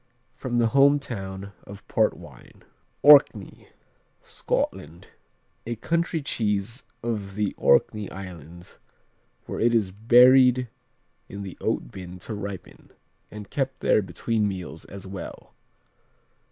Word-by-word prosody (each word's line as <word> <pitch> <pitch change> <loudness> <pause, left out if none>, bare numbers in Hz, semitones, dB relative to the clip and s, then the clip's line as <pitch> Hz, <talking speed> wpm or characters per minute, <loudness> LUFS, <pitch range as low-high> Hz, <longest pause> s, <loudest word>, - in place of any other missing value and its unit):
From 120 -2 -4
the 115 -1 +3
home 140 +1 +6
town 100 -7 -7
of 100 -1 -13
port - - +1
wine. - - -15 0.4
Orkney 140 -8 +5 0.6
Scotland 85 +2 -4 0.6
A 120 - -2
country 165 +5 -1
cheese 110 -1 -2 0.2
of 105 -5 -4
the 105 -1 -1
Orkney 105 +8 +2
Islands 85 -3 -11 0.7
where - - -6
it 120 +1 +3
is 105 -5 +1
buried 125 +3 +5 0.6
in 100 +1 -7
the 95 - -8
oat - - -2
bin 90 -1 -9
to 100 +5 -8
ripen, 100 -2 -8 0.4
and 105 -1 -10
kept 135 -2 -3
there - - +3
between 105 +4 -1
meals 90 -4 -7
as 100 -1 -10
well. 95 -2 -9
105 Hz, 120 wpm, -25 LUFS, 95-120 Hz, 0.7 s, home